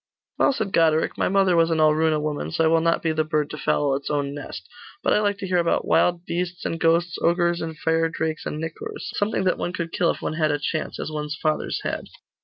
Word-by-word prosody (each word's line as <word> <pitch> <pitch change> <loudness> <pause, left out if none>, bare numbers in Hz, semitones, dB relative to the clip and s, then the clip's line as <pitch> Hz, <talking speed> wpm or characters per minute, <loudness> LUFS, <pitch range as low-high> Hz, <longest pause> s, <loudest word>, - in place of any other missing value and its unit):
'Well,' - - +5
said 195 -7 -3
Goderic, 160 -1 +3
'my - - 0
mother 190 -2 +3
was 165 0 +4
an 165 - +1
Alruna 155 0 +3
woman, 150 -1 -3
so 165 0 0
I - - +4
will 165 0 +3
not 165 0 +1
be 165 - +1
the 155 0 +1
bird 155 -1 -1
to 150 - -6
foul 140 +1 +1
its 140 - -4
own 145 -1 -1
nest. 105 -9 -8 0.4
But - - +3
I - - +4
like 205 -1 0
to 195 - -5
hear 180 -1 +2
about 170 -1 +1
wild 175 0 +2
beasts 175 +1 -3
and 165 - -2
ghosts, 165 +1 +2
ogres, 170 0 +2
and 160 -1 -5
fire 165 +1 +1
drakes, 160 -1 -3
and 150 - -4
nicors 160 0 -6
something 205 -1 0
that 185 - +1
one 175 - -2
could 170 -2 -4
kill 170 -1 +1
if - - -1
one - - -3
had 155 -1 +1
a 145 - +1
chance, 155 +2 -3
as - - -4
one's 150 -1 -4
fathers 155 -1 -1
had. - - -3
165 Hz, 245 wpm, -24 LUFS, 155-175 Hz, 0.4 s, Well